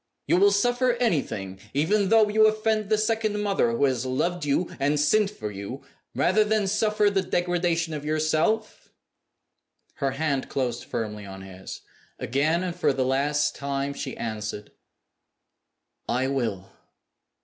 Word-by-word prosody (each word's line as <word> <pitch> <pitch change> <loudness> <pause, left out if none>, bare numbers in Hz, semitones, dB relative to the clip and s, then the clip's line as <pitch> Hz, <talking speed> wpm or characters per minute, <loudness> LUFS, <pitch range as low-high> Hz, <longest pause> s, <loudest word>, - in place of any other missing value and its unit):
You - - +3
will 200 +2 +5
suffer 245 +4 +2
anything 140 - -1 0.2
even 190 +7 +2
though 220 -1 +5
you 215 +1 +5
offend 215 -1 0
the 215 - +3
second 215 -1 0
mother 200 - +1
who 115 - 0
has 130 -3 0
loved 155 +6 -1
you 145 +5 0
and 145 +2 +1
sinned 195 +8 +3
for 105 - -6
you 100 +7 -7 0.3
rather 215 +4 +3
than 210 -1 +1
suffer 210 +1 +2
the 195 -1 +1
degradation 175 -2 0
of 150 -1 -5
yourself?" 155 +8 0 1.1
Her 135 -2 -1
hand 140 -2 -1
closed 120 -3 -2
firmly 105 -2 -4
on 95 0 -9
his. 95 0 -9 0.4
Again, 155 +6 0
and 180 -2 -3
for 175 - +1
the 130 -1 0
last 145 +3 +1
time, 140 0 -2
she - - -6
answered, 105 -2 -5 1.4
"I 125 +2 +1
will!" 110 -9 -2
155 Hz, 145 wpm, -25 LUFS, 130-210 Hz, 1.4 s, will